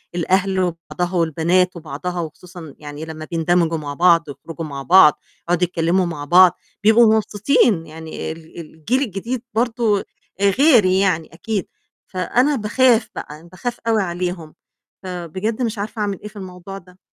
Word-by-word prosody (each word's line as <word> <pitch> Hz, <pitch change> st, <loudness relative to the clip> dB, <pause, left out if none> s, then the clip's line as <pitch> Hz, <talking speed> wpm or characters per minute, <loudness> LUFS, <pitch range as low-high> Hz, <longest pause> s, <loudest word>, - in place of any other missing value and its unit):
الأهل 190 Hz, +2 st, +1 dB
وبعضها 175 Hz, +1 st, -3 dB
والبنات 170 Hz, +3 st, +1 dB
وبعضها، 170 Hz, +2 st, -5 dB
وخصوصًا 165 Hz, -1 st, -10 dB
يعني 150 Hz, +1 st, -8 dB
لمّا 155 Hz, -1 st, -8 dB
بيندمجوا 165 Hz, 0 st, +1 dB
مع 145 Hz, -2 st, -5 dB
بعض، 170 Hz, +1 st, +4 dB
يخرجوا 155 Hz, +4 st, -8 dB
مع 140 Hz, -2 st, -6 dB
بعض، 170 Hz, -2 st, +6 dB, 0.3 s
يقعُدوا 175 Hz, +1 st, +1 dB
يتكلِّموا 175 Hz, +1 st, +1 dB
مع 150 Hz, -4 st, -5 dB
بعض، 180 Hz, +3 st, +7 dB, 0.3 s
بيبقوا 220 Hz, +1 st, +6 dB
مبسوطين، 210 Hz, -, +2 dB
يعني 160 Hz, 0 st, -7 dB
ال 160 Hz, +1 st, -11 dB
الجيل 165 Hz, -, -2 dB
الجديد 230 Hz, +1 st, -3 dB
برضه 225 Hz, -2 st, +1 dB, 0.4 s
آآ، 200 Hz, 0 st, +4 dB
غير 250 Hz, -1 st, +5 dB
يعني 185 Hz, -3 st, +1 dB
أكيد، 200 Hz, +3 st, -3 dB, 0.4 s
فأنا 245 Hz, -, +1 dB
باخاف 230 Hz, 0 st, +2 dB
بقى، 150 Hz, +1 st, -7 dB
أنا 170 Hz, -, -17 dB
باخاف 235 Hz, +7 st, -5 dB
أوي 220 Hz, -2 st, +3 dB
عليهم. 175 Hz, -2 st, -4 dB, 0.5 s
فبجد 185 Hz, +6 st, -4 dB
مش 230 Hz, -2 st, -1 dB
عارفة 210 Hz, +3 st, -5 dB
أعمل 200 Hz, -2 st, -2 dB
إيه -, -, -7 dB
في 210 Hz, -, -14 dB
الموضوع 190 Hz, 0 st, -8 dB
ده. 180 Hz, -1 st, -17 dB
180 Hz, 150 wpm, -20 LUFS, 165-210 Hz, 0.5 s, بعض